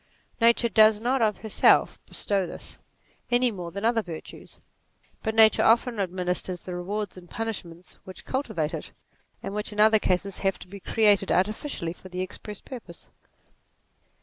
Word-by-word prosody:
Nature 235 +1 +5
does 215 -1 +5
not 245 +3 0
of 215 -2 +1
herself 220 -2 +3
bestow 195 -3 -1
this, - - -9 0.5
any 245 0 +3
more 180 -4 -6
than 200 +5 -5
other 230 0 +3
virtues; 165 -6 -10 0.6
but 220 -1 -2
nature 220 -1 +6
often 230 0 +3
administers 180 -1 -2
the 180 - -7
rewards 195 +3 -4
and 175 -1 -13
punishments 185 -6 -6
which 185 - -11
cul 265 - -1
tivate 165 - -3
it, - - -7 0.5
and 195 - -5
which 210 +1 -3
in 210 - -7
other 220 0 +6
cases 190 0 -1
have 195 -2 0
to - - -13
be 200 +2 -10
created 205 -1 +3
artificially 190 - -1
for 185 - -14
the 180 0 -4
express 200 +2 -7
purpose. 225 -10 -11
205 Hz, 160 wpm, -26 LUFS, 180-225 Hz, 0.6 s, nature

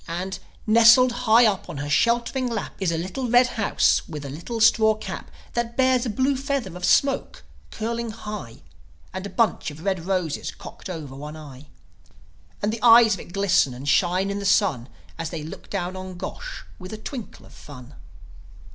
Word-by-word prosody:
And, 185 +3 -4 0.3
nestled 230 +3 +7
high 240 -1 +4
up 205 -4 0
on - - -6
her 145 +1 -4
sheltering 235 - +1
lap, 225 -3 -4
Is 190 -4 0
a 165 - -1
little 190 +9 -4
red 245 +2 +6
house 225 -4 +2
with 150 -3 -6
a 140 - -6
little 170 - -6
straw 220 0 +5
cap 215 - -7 0.2
That 235 0 -3
bears 260 -1 +3
a - - -2
blue 260 +6 +1
feather 270 -8 -3
of 180 - -9
smoke, 275 -1 +1 0.3
curling 235 +1 -3
high, 210 - -8 0.5
And 190 +1 -5
a - - -9
bunch 210 0 0
of 150 +2 -11
red 190 -3 -2
roses 180 -6 -1
cocked - - -10
over 155 -7 -7
one 150 +3 -8
eye. 145 -2 -12 1.0
And 210 +1 +1
the 230 - -5
eyes 230 -2 +7
of 195 - -4
it - - -11
glisten 185 -9 +2
and 135 +3 -8
shine 180 +6 +2
in 200 - -3
the - - -5
sun, 185 - +2 0.3
As 165 -1 -3
they 160 -3 -6
look 155 - -10
down 185 -2 -3
on 185 -1 -7
Gosh - - -7 0.2
with 185 -1 -9
a - - -5
twinkle 235 +1 -8
of - - -17
fun. 130 -2 -12
200 Hz, 190 wpm, -24 LUFS, 165-235 Hz, 1.0 s, nestled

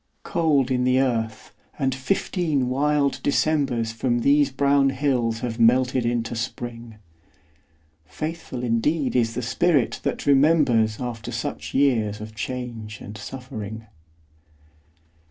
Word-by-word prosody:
Cold 145 -6 +1
in 125 -1 +1
the 130 +1 +3
earth, 115 -4 -1 0.2
and 135 -3 0
fifteen 145 -1 -1
wild 140 +1 +1
Decembers 140 -6 +1
From 120 +1 -1
these 145 +2 +4
brown 140 0 +3
hills 125 -4 0
have 120 -1 -4
melted 125 +1 +3
into 120 0 -1
Spring. 115 0 -6 1.1
Faithful 155 - -5
indeed 130 +5 0
is 115 -2 +1
the 125 - -2
spirit 150 +2 +1
that - - -3
remembers 135 -7 +3
After 120 -3 -5
such 75 +1 -5
years 115 -7 +2
of 110 0 -8
change 115 -2 -5
and 105 - -9
suffering! 110 -2 -7
125 Hz, 120 wpm, -24 LUFS, 115-140 Hz, 1.1 s, these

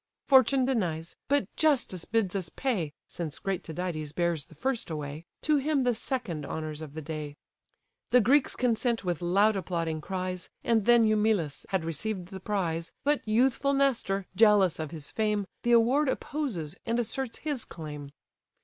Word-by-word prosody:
Fortune 260 -1 +5
denies, 175 -11 -1
but 285 -5 +2
justice 270 - +1
bids 215 -4 0
us 185 -4 -2
pay 195 - -1 0.2
(Since 160 -3 -5
great 195 -2 -2
Tydides 160 -3 -4
bears 170 -4 0
the 160 - -16
first 255 - -2
away) 150 +1 -5 0.2
To 305 -1 +3
him 285 -1 +1
the 245 -1 +3
second 225 - -3
honours 155 +1 -5
of 150 -2 -8
the 160 - -5
day." 150 -1 -5 0.7
The 250 - +6
Greeks 265 +5 +3
consent 235 -1 +1
with 175 -2 -1
loud 200 +5 +3
applauding 165 -4 -2
cries, 185 0 -4
And 225 -3 +2
then 240 -1 +6
Eumelus 210 -8 +1
had 190 -4 0
received 180 +3 -3
the 190 -1 -7
prize, 170 -5 -2
But 290 0 +2
youthful 260 +5 +2
Nestor, 240 -8 +1
jealous 205 -5 +5
of 155 -2 -3
his 155 -3 -8
fame, 210 -2 0 0.2
The 240 - +2
award 255 +5 +4
opposes, 215 - -3
and 230 +1 -1
asserts 240 +1 -2
his 290 -6 -2
claim. 150 -3 -8
195 Hz, 160 wpm, -29 LUFS, 165-240 Hz, 0.7 s, The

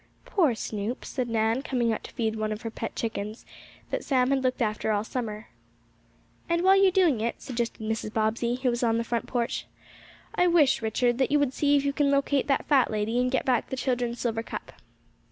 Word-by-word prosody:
"Poor 320 - +2
Snoop!" 220 +2 -4
said 250 -3 -3
Nan, 225 +2 +1
coming 245 -5 0
out - - -5
to - - -10
feed 225 -3 -1
some 215 -1 -2
of 215 +1 -5
her 225 - -4
pet 225 - -5
chickens, 215 -1 -4 0.5
that - - -2
Sam 255 -1 +2
had 275 -1 +2
looked 255 -1 0
after 215 -2 0
all 205 -1 +1
summer. 220 -2 -5 1.0
"And 340 +1 +1
while 380 +1 +6
you 390 0 +6
are 375 -1 +4
about 255 -9 +1
it," 235 +1 -2
suggested 235 -3 -4
Mrs. 220 0 -2
Bobbsey, 225 +2 0
who 255 0 0
was 240 - -2
on 230 -2 +2
the 230 - 0
front 235 0 -2
porch, 240 -2 -2 0.7
"I 360 - +3
wish, 325 -8 +4
Richard, 240 +2 +1
that 265 - +2
you 295 - +5
would 285 -3 +1
see 285 +1 +3
if 280 - 0
you 280 - +1
can 285 -1 +2
locate 280 -1 +1
that 275 - +1
fat 270 -4 +4
lady, 215 +2 -1
and 250 0 +2
get 265 - 0
back 250 -2 +1
the 265 - -4
children's 245 -2 -1
silver 225 -2 -1
cup." - - -7
240 Hz, 220 wpm, -27 LUFS, 225-275 Hz, 1.0 s, while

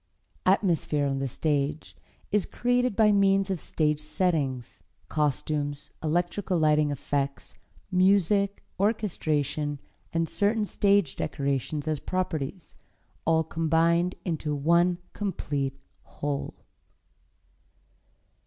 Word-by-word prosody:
Atmosphere 170 -6 +2
on 135 -1 -1
the 135 - -1
stage 145 +2 -1 0.4
is 205 -1 +1
created 245 -2 +1
by 215 0 +5
means 195 -1 +3
of 185 - -2
stage 150 -1 0
settings, 150 - -1 0.3
costumes, 145 -1 -1
electrical 175 +4 0
lighting 150 -1 +3
effects, 140 0 -3 0.4
music, 200 +1 +3 0.2
orchestration, 155 - 0 0.3
and 165 0 0
certain 210 +5 +1
stage 200 -6 +2
decorations 140 +1 -2
as 155 -2 0
properties, 180 -2 -3 0.5
all 160 0 +3
combined 165 +2 +2
into 155 -4 -1
one 170 +4 +3 0.2
complete 145 -9 -2 0.2
whole. 145 -1 -4
160 Hz, 95 wpm, -27 LUFS, 145-195 Hz, 0.5 s, by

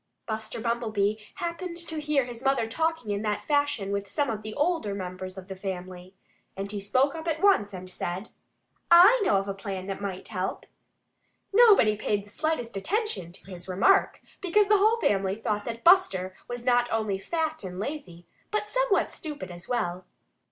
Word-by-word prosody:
Buster 220 0 -4
Bumblebee 220 -3 0 0.2
happened 340 0 -4
to 330 -2 -4
hear 295 -3 +1
his 240 -1 -7
mother 270 -4 +2
talking 320 -2 -1
in 200 0 -1
that 210 -1 -2
fashion 285 -9 +1
with 200 0 -2
some 285 +1 0
of 215 -1 -4
the 215 0 -7
older 295 - 0
members 185 0 -6
of 185 -1 -9
the 190 - -6
family. 185 -1 -7 0.4
And 200 +1 -4
he 205 -1 -4
spoke 255 +8 +2
up 325 0 -7
at 315 -1 0
once 375 - +4
and 185 -1 -8
said: 185 +2 -5 0.6
"I 380 +8 +8
know 205 - +3
of 195 0 +1
a 195 - -2
plan 195 -1 -5
that 195 0 -5
might 195 -2 -5
help." 190 -3 -3 0.9
Nobody 405 - +6
paid 205 -1 -1
the - - -15
slightest 245 -2 -2
attention 355 - -2
to 195 +2 -14
his 175 0 -9
remark, 200 - +3 0.2
because 395 +2 +3
the 420 -1 +5
whole 440 +3 +4
family 195 - +1
thought 210 -2 -2
that 230 0 -5
Buster 195 - +4
was 245 0 -6
not 245 -1 +3
only 215 -3 0
fat 315 +5 -2
and 180 -1 -6
lazy, 195 - -6 0.2
but 425 -1 -2
somewhat - - +2
stupid 300 - -7
as 175 0 -11
well. 185 -7 -2
220 Hz, 180 wpm, -27 LUFS, 195-320 Hz, 0.9 s, I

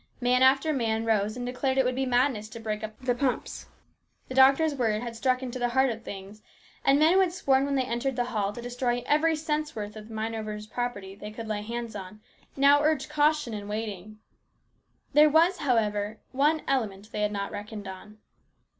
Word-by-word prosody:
Man 250 0 +2
after 270 +4 +4
man 225 -4 0
rose 215 0 +1
and 245 - -4
declared 260 +2 -1
that - - +6
it - - -1
would 250 - +1
be 265 +1 -1
madness 245 -4 +1
to 230 - -9
break 215 -1 -4
up 215 0 -6
the 255 -1 +1
pumps. 255 +1 -2 0.6
The - - -5
doctor's 275 +4 +5
words 225 -4 0
had 235 -1 -6
struck 255 +2 0
into 255 0 -5
the 245 0 +1
heart 265 +1 +3
of 225 0 -6
things, 200 0 -9 0.4
and 275 0 +5
men 310 +3 +5
who 380 - +5
had 375 -3 +3
sworn 275 -7 +2
when 280 0 -1
they 265 - +2
entered 250 +2 -2
the 245 -1 0
hall 210 -5 -1
to 235 +3 -8
destroy 245 0 -1
every 315 +2 +3
cent's 305 0 -2
worth 210 -1 -5
of 215 0 -10
mine 220 0 -3
owners' 215 -1 -5
property 215 -4 -4
they 210 +1 -8
could 225 +1 -8
lay 210 -1 -2
hands 235 +1 -5
on, 195 +1 -8 0.4
now 280 +1 +5
urged 300 -2 +1
caution 300 -4 +2
and 205 -1 -6
waiting. 215 -1 -5 1.0
There 300 +1 +7
was, 335 +5 +4
however, 215 -5 0
one 295 +4 +2
element 215 -6 -2
they 210 - -3
had 210 0 +1
not 200 -1 -3
reckoned 205 0 -7
on. 190 +3 -10
240 Hz, 210 wpm, -27 LUFS, 215-270 Hz, 1.0 s, There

